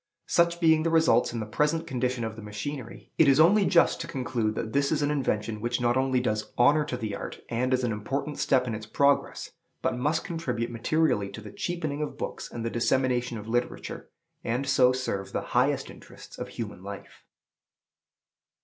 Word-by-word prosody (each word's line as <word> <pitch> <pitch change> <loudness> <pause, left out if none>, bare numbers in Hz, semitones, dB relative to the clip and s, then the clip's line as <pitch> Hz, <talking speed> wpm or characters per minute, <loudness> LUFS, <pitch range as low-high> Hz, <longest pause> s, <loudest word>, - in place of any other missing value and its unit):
Such 170 0 +2
being 160 -2 +5
the 165 - +1
results 160 -7 +4
in 120 - -4
the - - -3
present 150 +9 0
condition 125 -4 -1
of 110 -1 -4
the 115 - -9
machinery, 115 +5 -7
it 160 - +7
is 135 +1 +5
only 195 +5 +6
just 170 - +4
to - - -5
conclude 120 -6 -2
that 110 0 -4
this 140 0 +2
is 150 -2 +1
an 145 - +1
invention 110 -6 -1
which 120 +2 -1
not 120 0 +2
only 130 -1 +2
does 110 -3 -2
honor 145 +5 +5
to 125 - -3
the 110 -4 -4
art, - - -7
and 125 +2 0
is 130 0 +2
an 120 - +1
important 135 +8 -3
step 130 -1 +3
in 120 - -3
its 110 0 -6
progress, 140 +4 +1 0.3
but - - +1
must 150 +6 0
contribute 160 -10 -3
materially 115 -3 +1
to 110 - -9
the 105 -1 -10
cheapening 155 +1 -3
of 150 - -4
books - - -5
and 115 -1 -5
the 115 - -1
dissemination 125 0 +1
of 105 0 -8
literature, 120 +2 -3 0.3
and 125 +4 -1
so 130 -2 +5
serve 125 -7 -3
the - - -1
highest - - +2
interests - - -13
of - - -4
human 105 -5 -6
life. 100 +1 -9
125 Hz, 195 wpm, -27 LUFS, 115-150 Hz, 0.3 s, it